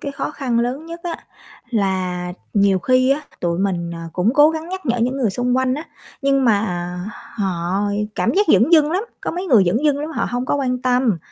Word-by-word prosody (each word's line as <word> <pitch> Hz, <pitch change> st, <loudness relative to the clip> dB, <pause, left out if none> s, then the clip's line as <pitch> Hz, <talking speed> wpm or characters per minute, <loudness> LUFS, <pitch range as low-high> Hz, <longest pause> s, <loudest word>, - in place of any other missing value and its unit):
cái 280 Hz, -, -5 dB
khó 275 Hz, -, -3 dB
khăn 255 Hz, -6 st, -1 dB
lớn 255 Hz, +7 st, -2 dB
nhất 335 Hz, +1 st, -8 dB
á, 345 Hz, -2 st, -3 dB, 0.5 s
là 185 Hz, -4 st, -1 dB, 0.2 s
nhiều 200 Hz, -2 st, +4 dB
khi 255 Hz, +6 st, +3 dB
á, 280 Hz, -, +2 dB, 0.2 s
tụi 170 Hz, -1 st, -1 dB
mình, 180 Hz, -3 st, -1 dB
ờ, 165 Hz, -, -7 dB
cũng 200 Hz, +7 st, +1 dB
cố 295 Hz, +2 st, +6 dB
gắng 320 Hz, +1 st, -5 dB
nhắc 375 Hz, -2 st, -6 dB
nhở 240 Hz, -1 st, +1 dB
những 250 Hz, +3 st, 0 dB
người 240 Hz, -7 st, +1 dB
xung 245 Hz, +4 st, 0 dB
quanh 260 Hz, 0 st, +1 dB
á, 300 Hz, +4 st, -5 dB, 0.4 s
nhưng 275 Hz, -1 st, +2 dB
mà 200 Hz, -6 st, +1 dB, 0.5 s
họ 190 Hz, -1 st, -1 dB, 0.3 s
cảm 230 Hz, -, +1 dB
giác 410 Hz, +2 st, +3 dB
dửng 260 Hz, +9 st, +4 dB
dưng 305 Hz, -2 st, +6 dB
lắm, 375 Hz, +3 st, 0 dB, 0.2 s
có -, -, -3 dB
mấy 360 Hz, +3 st, -4 dB
người 230 Hz, -, +5 dB
dửng 225 Hz, -, +1 dB
dưng 290 Hz, -2 st, +3 dB
lắm 300 Hz, +2 st, -4 dB
họ -, -, -1 dB
hông 245 Hz, +1 st, -2 dB
có -, -, +1 dB
quan 255 Hz, -3 st, 0 dB
tâm. 250 Hz, -6 st, +2 dB
250 Hz, 225 wpm, -20 LUFS, 195-290 Hz, 0.5 s, cố